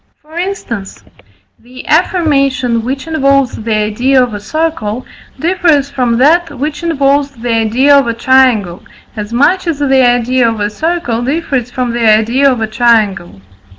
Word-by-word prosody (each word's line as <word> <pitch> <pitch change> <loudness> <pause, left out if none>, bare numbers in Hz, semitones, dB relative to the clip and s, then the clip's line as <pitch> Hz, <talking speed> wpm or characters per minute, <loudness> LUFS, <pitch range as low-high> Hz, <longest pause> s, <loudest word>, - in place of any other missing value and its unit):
For 315 +3 -9
instance, 235 - -5 0.6
the 250 +2 -13
affirmation 275 -8 +1
which 265 +3 -4
involves 275 -5 +1
the 220 0 -3
idea 240 +5 +1
of 245 -3 -4
a 205 - -5
circle, 255 -2 -3 0.3
differs 325 -5 +1
from 245 -4 0
that 310 +3 +2
which 295 +3 -4
involves 285 -4 +1
the 235 0 -3
idea 235 +6 +3
of 275 -3 +3
a 230 - -2
triangle, 240 -8 +2 0.3
as 210 0 -6
much 340 +10 +1
as 330 -4 -1
the 270 -2 +2
idea 245 0 +2
of 225 -1 -4
a 205 0 -2
circle 315 -3 -2
differs 270 -3 -2
from 250 -1 -3
the 230 -2 +2
idea 235 +6 +2
of 245 -3 -3
a - - +1
triangle. 215 - 0
255 Hz, 155 wpm, -12 LUFS, 230-290 Hz, 0.6 s, idea